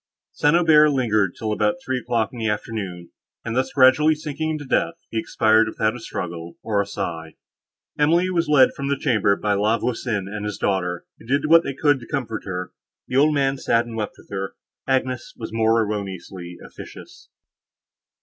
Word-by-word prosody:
St. 145 +2 +2
Aubert 155 -3 +6
lingered 110 -9 +1
till 110 -1 -2
about 105 0 +1
three 130 -1 -1
o'clock 115 -2 -1
in 120 - -8
the 110 -1 0
afternoon, 100 -5 -4 0.3
and, 115 0 -3
thus 130 +1 0
gradually 140 +4 +5
sinking 155 0 -4
into 155 -2 -4
death, 150 +5 0 0.2
he 115 - -1
expired 110 0 +3
without 110 +1 -1
a - - -7
struggle, 85 -6 -6
or 105 -2 +1
a 100 - -4
sigh. 85 -6 -5 0.6
Emily 170 +5 +3
was 170 -2 0
led 145 -3 +5
from 140 - -4
the 140 - +1
chamber 105 -6 +2
by 105 +1 -1
La 105 +3 +2
Voisin 115 -5 -2
and 105 +1 -5
his 105 -1 -4
daughter, 90 -3 -1
who - - -15
did 140 +4 +1
what 165 +2 +7
they 140 - -5
could 145 -1 +2
to 120 - -12
comfort 115 -5 -4
her. 90 -1 -5 0.4
The 125 - 0
old 150 +2 +4
man 135 -1 +1
sat 115 -1 +2
and 115 -1 -8
wept 110 -2 -4
with - - -19
her. 95 -1 -4 0.3
Agnes 130 -2 -1
was 110 - -7
more 115 0 +3
erroneously 95 -4 -6
officious. - - -12
115 Hz, 190 wpm, -22 LUFS, 100-140 Hz, 0.6 s, what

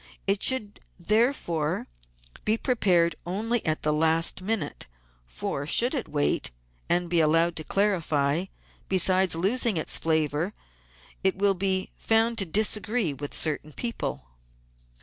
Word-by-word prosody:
It 195 0 +1
should 225 -6 +1 0.2
therefore 175 - 0 0.6
be 215 +1 +1
prepared 180 - +2
only 220 +6 -1
at 155 0 -1
the 150 - +1
last 160 +3 +2
minute; 215 - -3 0.4
for, 140 - -5
should 245 - +4
it 265 - -3
wait 145 -1 0 0.4
and 175 0 +2
be 170 0 +1
allowed 165 +2 +3
to 155 - -3
clarify, 165 -5 0 0.4
besides 185 -1 +3
losing 205 +4 +1
its 155 - +1
flavour 160 +3 -1 0.7
it 190 -1 +2
will 200 0 +3
be 190 0 -1
found 225 +1 +1
to 195 - 0
disagree 210 0 +1
with 145 +1 -6
certain 155 -1 0
people. 235 - -4
185 Hz, 130 wpm, -26 LUFS, 160-215 Hz, 0.7 s, should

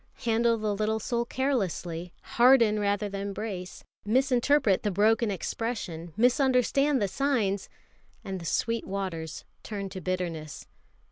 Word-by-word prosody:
Handle 230 0 +3
the 215 -1 -1
little 215 +1 0
soul 235 +2 -1
carelessly, 185 - -2
harden 235 -4 +4
rather 205 0 0
than 200 0 -4
brace, 190 -3 -6 0.2
misinterpret 250 -1 +3
the 210 - 0
broken 215 +4 +3
expression, 190 -4 -4
misunderstand 260 +3 +3
the 205 - +1
signs 205 -4 0 0.5
and 190 -1 -4
the 170 - -9
sweet 230 +7 -1
waters 185 -5 -4 0.2
turn 200 -2 -5
to 185 0 -7
bitterness. 170 -4 -4
210 Hz, 125 wpm, -28 LUFS, 190-235 Hz, 0.5 s, harden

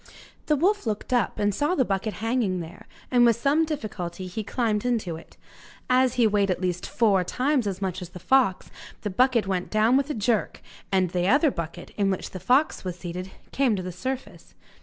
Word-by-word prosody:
The 300 - +3
wolf 375 - +1
looked 215 +3 -2
up, 245 - +1
and 205 -1 +1
saw 295 - 0
the 260 - +2
bucket 200 +1 -2
hanging 225 -6 0
there, 165 -1 -9 0.2
and 245 -1 +5
with 235 -2 +5
some 285 +7 +2
difficulty 195 - -5
he 185 +4 -5
climbed 215 -1 -1
into 225 -9 -1
it. 165 - -14 0.5
As 255 0 +3
he 245 -2 +4
weighed 205 -2 +2
at 185 - 0
least 180 -1 -2
four 200 -4 +3
times 255 - 0
as 195 0 -3
much 185 0 -2
as 180 - -7
the 180 - -10
fox 245 0 +2 0.3
the 210 - -3
bucket 245 +2 +3
went 185 -2 -2
down 220 +4 +3
with 280 +1 0
a 300 - -2
jerk, 220 0 -1 0.3
and 185 -3 +2
the 180 0 0
other 290 - +4
bucket, 170 -4 -6
in 200 -2 +2
which 190 - -3
the 185 - -7
fox 265 - +2
was 180 -2 -4
seated, 180 +1 -6 0.2
came 260 -5 +2
to 185 - -4
the 180 - -5
surface. 260 +9 -6
210 Hz, 205 wpm, -25 LUFS, 185-255 Hz, 0.5 s, and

